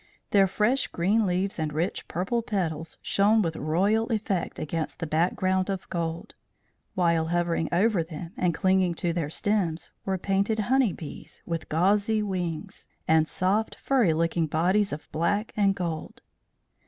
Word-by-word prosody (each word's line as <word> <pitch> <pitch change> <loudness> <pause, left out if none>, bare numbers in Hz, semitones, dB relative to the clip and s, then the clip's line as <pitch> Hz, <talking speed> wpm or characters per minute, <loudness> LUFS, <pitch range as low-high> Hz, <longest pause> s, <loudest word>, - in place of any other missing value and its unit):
Their 195 -2 +5
fresh 220 +8 +1
green 200 +5 +1
leaves 185 +1 -1
and 155 -1 -1
rich 165 +5 -2
purple 190 +8 -1
petals 165 -8 -3
shone 210 +2 +3
with 165 -2 -2
royal 200 +9 +1
effect 205 -6 -2
against 155 +1 -3
the - - -3
background 185 +4 +1
of 190 -1 -3
gold; 165 -1 -3 0.6
while 170 -3 +2
hovering 170 -1 0
over 195 +1 +3
them, 165 +2 -8
and 180 -1 +1
clinging 185 0 +2
to 170 0 -1
their 165 -4 -2
stems, 175 -2 -1
were 190 -1 -1
painted 200 +4 0
honey 245 +1 +2
bees, 160 -3 -10
with 165 -1 -4
gauzy 205 +6 +2
wings, 180 -5 -4 0.2
and 160 0 +4
soft, 200 +6 0
furry 250 -10 +2
looking 165 0 +1
bodies 185 +7 +2
of 150 - -6
black 200 +7 0
and 200 -2 +3
gold. 170 -4 -5
180 Hz, 150 wpm, -27 LUFS, 165-205 Hz, 0.6 s, Their